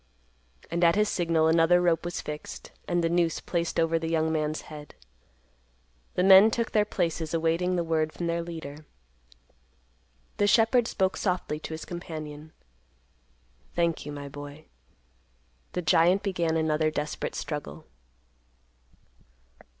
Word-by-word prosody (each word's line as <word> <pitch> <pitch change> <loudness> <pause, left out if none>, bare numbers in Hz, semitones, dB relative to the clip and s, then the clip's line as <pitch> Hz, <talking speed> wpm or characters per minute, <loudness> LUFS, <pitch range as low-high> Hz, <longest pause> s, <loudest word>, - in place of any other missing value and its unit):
And 170 +1 0
at 170 +1 +5
his 210 +1 +3
signal 165 -3 +1
another 165 +2 +4
rope 170 -2 +1
was 175 - -3
fixed, 150 0 -8 0.2
and 175 -1 0
the - - +3
noose 170 -1 +1
placed 170 -1 -2
over 165 0 +2
the 160 0 -3
young 160 -1 +1
man's 155 -1 -1
head. 150 -2 -11 1.2
The 180 - +2
men 195 +3 +8
took 230 0 -2
their 210 -1 +3
places, 165 -5 -2
awaiting 165 +3 +1
the 175 - 0
word 160 -1 0
from 175 - -5
their 170 0 -1
leader. 155 -3 -8 1.5
The 205 - +2
shepherd 225 +2 +4
spoke 190 -4 0
softly 180 -5 -2
to 160 - -6
his 160 - -8
companion, 155 -3 -7 1.2
"Thank 170 -1 0
you, 145 - -7
my 145 -1 -7
boy." 145 +2 -10 1.1
The 180 - -2
giant 175 +5 +4
began 170 -5 0
another 155 -1 +1
desperate 150 -1 -4
struggle. 150 - -5
165 Hz, 135 wpm, -27 LUFS, 155-175 Hz, 1.5 s, men